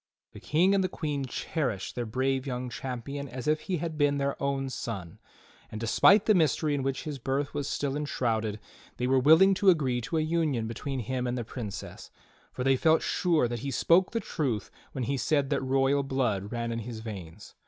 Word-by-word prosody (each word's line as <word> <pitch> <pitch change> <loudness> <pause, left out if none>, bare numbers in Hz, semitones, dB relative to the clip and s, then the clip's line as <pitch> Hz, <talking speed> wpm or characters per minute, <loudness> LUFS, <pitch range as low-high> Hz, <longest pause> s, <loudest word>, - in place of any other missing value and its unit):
The - - -10
King 180 +6 +2
and 195 -1 +3
the 185 - 0
Queen 145 -6 -3
cher 150 +3 -2
ished 95 -6 -4
their 120 -2 -3
brave 130 +3 -1
young 125 -1 -3
champion 135 +3 -5
as 125 +3 -6
if 155 0 +3
he 180 +3 -2
had 160 -1 -4
been 145 -1 +3
their 140 0 0
own 140 -1 -1
son, 95 -9 -6 0.5
and 110 - -5
despite 195 - +5
the 215 - +5
mystery 155 -3 +2
in 140 - 0
which 135 0 -2
his 150 -3 -5
birth 135 +3 -2
was 145 -1 -2
still 140 -1 -1
enshrouded, 115 -7 -1 0.4
they 125 - -1
were 130 +1 +3
willing 160 +8 +6
to 195 +1 +4
agree 135 -8 +2
to 160 +8 -2
a - - +2
union 155 -7 0
between 130 +4 -4
him 125 +2 -2
and 125 +1 -2
the 120 - -2
'Princess, 110 -3 -7 0.4
for 125 - -4
they 135 0 +3
felt 160 +3 +3
sure 165 -8 +2
that 120 0 -4
he 140 - -4
spoke 170 +8 +3
the 230 - -1
truth 135 - -2 0.2
when 130 - -3
he 135 +4 -1
said 140 0 +1
that - - +1
royal 135 +1 +2
blood 120 -7 -1
ran 115 -1 -2
in 115 - -2
his 115 0 -7
veins. 100 -4 -9
135 Hz, 210 wpm, -28 LUFS, 120-150 Hz, 0.5 s, willing